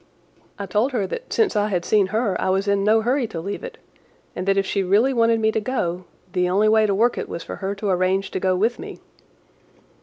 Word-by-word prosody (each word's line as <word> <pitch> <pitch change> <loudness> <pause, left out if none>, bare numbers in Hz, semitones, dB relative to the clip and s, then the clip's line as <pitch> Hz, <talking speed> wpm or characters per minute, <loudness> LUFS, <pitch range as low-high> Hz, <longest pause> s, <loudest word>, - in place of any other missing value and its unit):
I 200 - -5
told 210 +8 0
her 215 -6 0
that 470 - -7
since 430 - +1
I 210 0 +2
had 180 -4 -2
seen 205 -3 +3
her 215 -1 -1
I - - 0
was 195 +2 0
in 200 0 +1
no 220 +2 +3
hurry 245 +2 0
to 175 -6 -6
leave 195 - -5
it, 485 -2 -8 0.6
and 185 - -5
that 195 0 +2
if 195 - +2
she 195 - -1
really 205 +8 +2
wanted 230 -1 +3
me 220 0 +2
to 220 - -1
go, 180 -7 -2 0.3
the 180 -1 +1
only 200 +4 +2
way 220 0 +4
to 200 - +1
work 235 +4 +2
it - - -5
was 170 - -6
for - - -7
her 195 +1 -3
to 205 +1 -4
arrange 185 +2 0
to - - -2
go 185 0 +1
with 225 +6 0
me. - - -8
205 Hz, 245 wpm, -22 LUFS, 190-225 Hz, 0.6 s, way